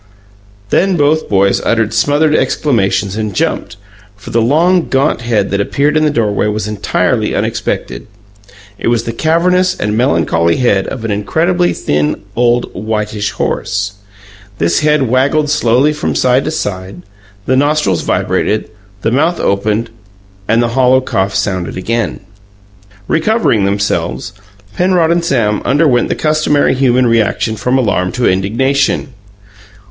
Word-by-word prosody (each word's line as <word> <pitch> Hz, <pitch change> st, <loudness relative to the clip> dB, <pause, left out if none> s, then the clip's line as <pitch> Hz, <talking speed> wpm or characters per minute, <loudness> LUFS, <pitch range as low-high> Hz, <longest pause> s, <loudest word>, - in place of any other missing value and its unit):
Then 190 Hz, -1 st, +2 dB
both 150 Hz, +1 st, +1 dB
boys 100 Hz, -1 st, +2 dB
uttered 115 Hz, -2 st, 0 dB
smothered 150 Hz, +1 st, +2 dB
exclamations 105 Hz, -10 st, 0 dB
and 105 Hz, -3 st, -3 dB
jumped, -, -, -2 dB, 0.4 s
for 100 Hz, -, -10 dB
the 115 Hz, -, +2 dB
long, 165 Hz, +8 st, +2 dB
gaunt 135 Hz, -1 st, +1 dB
head 110 Hz, -4 st, 0 dB
that 100 Hz, 0 st, 0 dB
appeared 145 Hz, +8 st, 0 dB
in 155 Hz, -, +3 dB
the 155 Hz, -, +3 dB
doorway 110 Hz, -7 st, 0 dB
was 105 Hz, 0 st, -2 dB
entirely 105 Hz, -1 st, -1 dB
unexpected. -, -, -3 dB, 0.7 s
It -, -, -3 dB
was 120 Hz, -1 st, +1 dB
the 115 Hz, -, -4 dB
cavernous 180 Hz, +7 st, +1 dB
and 105 Hz, +1 st, -1 dB
melancholy 85 Hz, -6 st, +1 dB
head 100 Hz, -6 st, +1 dB
of 120 Hz, -4 st, -6 dB
an 110 Hz, -, -2 dB
incredibly 170 Hz, -, 0 dB
thin, 75 Hz, +3 st, -1 dB
old, 120 Hz, 0 st, +1 dB
whitish 105 Hz, 0 st, -3 dB
horse. 100 Hz, 0 st, -2 dB, 0.6 s
This 85 Hz, +1 st, +1 dB
head 150 Hz, -1 st, +2 dB
waggled 135 Hz, +4 st, +1 dB
slowly 135 Hz, +1 st, +2 dB
from 150 Hz, -, -3 dB
side 130 Hz, +1 st, +2 dB
to -, -, -1 dB
side; 95 Hz, -, -5 dB, 0.4 s
the 130 Hz, -, +1 dB
nostrils 145 Hz, -, +1 dB
vibrated; 110 Hz, +1 st, -1 dB, 0.3 s
the 115 Hz, -, +1 dB
mouth 160 Hz, +7 st, +1 dB
opened, 105 Hz, +3 st, -1 dB, 0.6 s
and 115 Hz, +2 st, +2 dB
the 120 Hz, -, 0 dB
hollow 130 Hz, +1 st, +3 dB
cough 95 Hz, -5 st, -2 dB
sounded 95 Hz, -4 st, -2 dB
again. 115 Hz, +3 st, -2 dB, 0.9 s
Recovering 165 Hz, -, +1 dB
themselves, 100 Hz, -, -2 dB, 0.4 s
Penrod 175 Hz, -2 st, +2 dB
and 170 Hz, 0 st, +1 dB
Sam 115 Hz, -10 st, 0 dB
underwent 140 Hz, -4 st, +2 dB
the -, -, 0 dB
customary 155 Hz, -1 st, +1 dB
human 130 Hz, -1 st, +2 dB
reaction 115 Hz, -1 st, +1 dB
from 125 Hz, +4 st, 0 dB
alarm 90 Hz, -7 st, 0 dB
to 125 Hz, -, 0 dB
indignation. 130 Hz, +10 st, 0 dB
120 Hz, 140 wpm, -13 LUFS, 105-150 Hz, 0.9 s, in